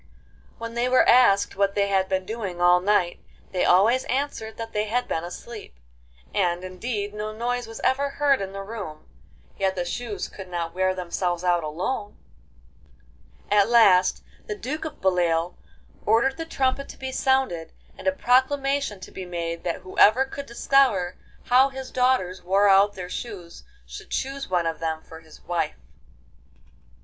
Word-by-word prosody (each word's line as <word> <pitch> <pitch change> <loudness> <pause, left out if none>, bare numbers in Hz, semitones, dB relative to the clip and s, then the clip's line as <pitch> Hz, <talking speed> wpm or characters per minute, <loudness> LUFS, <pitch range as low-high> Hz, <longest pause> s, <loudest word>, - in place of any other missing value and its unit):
When 230 0 -6
they 240 +1 0
were 255 - +4
asked 200 -5 +5
what 200 0 +1
they 200 0 +2
had 190 -1 +1
been 190 -1 -1
doing 205 -5 -5
all 175 0 +5
night, 185 -2 +1 0.3
they 185 - 0
always 220 +8 +4
answered 255 -5 -3
that 225 0 -6
they 210 0 0
had 245 +4 -1
been 165 - -2
asleep; 205 - -9 0.6
and, 175 -2 0
indeed, 205 +2 -4
no 210 +1 -4
noise 240 +2 -2
was 225 - -9
ever 280 +2 +1
heard 280 -3 +2
in 195 -1 -4
the 195 0 -6
room, 195 -8 -8 0.5
yet 190 -1 +1
the 175 -1 -2
shoes 215 +3 -4
could 190 -2 -10
not 170 -2 -4
wear 185 0 +1
themselves 175 -1 -2
out 175 -2 +2
alone! 185 +8 -4 1.3
At 205 0 +4
last 195 -6 +5 0.2
the 425 - -3
Duke 305 -1 -4
of 310 - -7
Beloeil 175 -2 +1 0.5
ordered 235 +6 +2
the 325 0 -5
trumpet 275 -2 -1
to - - -10
be 265 0 -5
sounded, 260 - 0 0.2
and - - -8
a - - +5
proclamation 275 -3 +1
to - - -10
be 185 -1 -7
made 170 -1 -4
that 170 - -2
whoever 215 +7 +4
could 280 +1 -8
discover 235 -7 +2 0.2
how 260 +2 +4
his 265 -1 -8
daughters 250 -8 +1
wore 195 +3 +3
out 200 +1 +5
their 180 -1 -6
shoes 180 - -8 0.2
should - - -10
choose 275 -2 -3
one 175 -2 +1
of 165 -1 -2
them 160 -1 -3
for 160 - -12
his 160 -1 -17
wife. 170 -3 -2
200 Hz, 165 wpm, -24 LUFS, 180-250 Hz, 1.3 s, asked